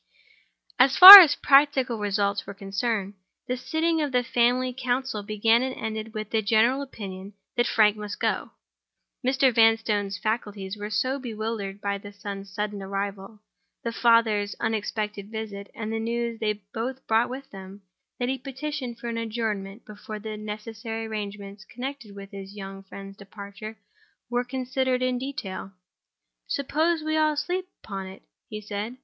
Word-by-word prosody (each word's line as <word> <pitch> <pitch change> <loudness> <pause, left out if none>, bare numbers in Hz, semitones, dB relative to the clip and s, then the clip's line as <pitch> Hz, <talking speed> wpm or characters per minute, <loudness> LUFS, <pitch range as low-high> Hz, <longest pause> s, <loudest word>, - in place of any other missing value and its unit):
So 255 - +8
far 370 +9 +14
as 320 -6 +6
practical 275 -4 +3
results 200 -1 -1
were 200 - -8
concerned, 200 +1 -3 0.3
the 250 - -2
sitting 320 +5 -1
of 295 -2 -2
the 250 -1 +1
family 245 +2 +1
council 255 -3 -2
began 215 +3 +2
and 260 0 -3
ended 220 0 -6
with 215 -1 -5
the 225 - +1
general 225 +6 +2
opinion 200 -7 -8 0.2
that 240 0 +1
Frank 210 -2 +3
must 210 0 -7
go. - - -1 0.7
Mr. 265 0 +2
Vanstone's 225 -3 +2
faculties 205 -3 -3
were 210 0 -6
so 260 +5 -1
bewildered 215 -4 -5
by 200 0 -2
the 205 +1 -11
son's 200 -1 -8
sudden 205 0 -4
arrival, 195 +1 -5 0.4
the 235 - -2
father's 225 -3 +2
unexpected 210 -2 -3
visit, 215 -3 -7
and 220 0 -5
the 225 - -2
news 235 0 -3
they 210 -1 0 0.2
both 255 +3 -5
brought 225 +1 +2
with 265 +2 -8
them, 195 +1 -11 0.3
that 245 - -2
he 265 +1 -2
petitioned 265 -1 -6
for 240 - -8
an 230 -1 -3
adjournment 220 -2 -4
before 215 +1 -9
the 215 +1 -7
necessary 220 +1 -6
arrangements 200 -2 -7
connected 245 -2 -8
with 200 0 -10
his 195 0 -9
young 195 -1 -8
friend's 195 0 -11
departure 200 +2 -10 0.5
were 245 0 0
considered 255 0 -2
in 255 -1 0
detail. 215 -8 -6 0.7
"Suppose 315 +4 0
we 310 0 -1
all 310 -1 +2
sleep 360 +5 -3 0.2
upon 195 -2 -6
it?" 190 +1 -12 0.3
he 215 - -6
said. 210 +4 -6
220 Hz, 155 wpm, -25 LUFS, 205-250 Hz, 0.7 s, far